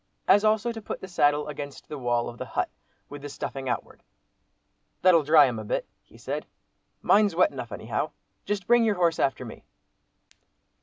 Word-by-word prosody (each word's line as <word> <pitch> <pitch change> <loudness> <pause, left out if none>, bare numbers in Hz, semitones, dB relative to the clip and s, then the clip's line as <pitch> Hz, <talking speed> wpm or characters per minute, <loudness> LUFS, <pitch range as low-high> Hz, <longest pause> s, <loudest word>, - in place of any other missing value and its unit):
As 205 - +6
also 220 +2 +2
to 225 -1 -7
put - - -6
the 190 - -8
saddle 145 -4 +2
against 145 -1 -7
the 150 - -6
wall 120 -1 0
of 120 - -9
the - - -4
hut, - - -2 0.4
with 145 0 -9
the 145 - -7
stuffing 135 -1 -5
outward. 120 - -4 1.0
"That'll 180 -3 +6
dry 150 0 +6
'em 120 -4 -2
a - - -6
bit," 105 - -2 0.2
he - - -20
said; - - -5 0.6
"mine's 205 -4 +4
wet 185 - +4
enough - - -7
anyhow. - - -3 0.3
Just 205 -3 -3
bring 240 +2 +5
your 215 -2 +2
horse 170 -3 +1
after 135 -2 0
me." 115 - -10
150 Hz, 185 wpm, -26 LUFS, 135-205 Hz, 1.0 s, As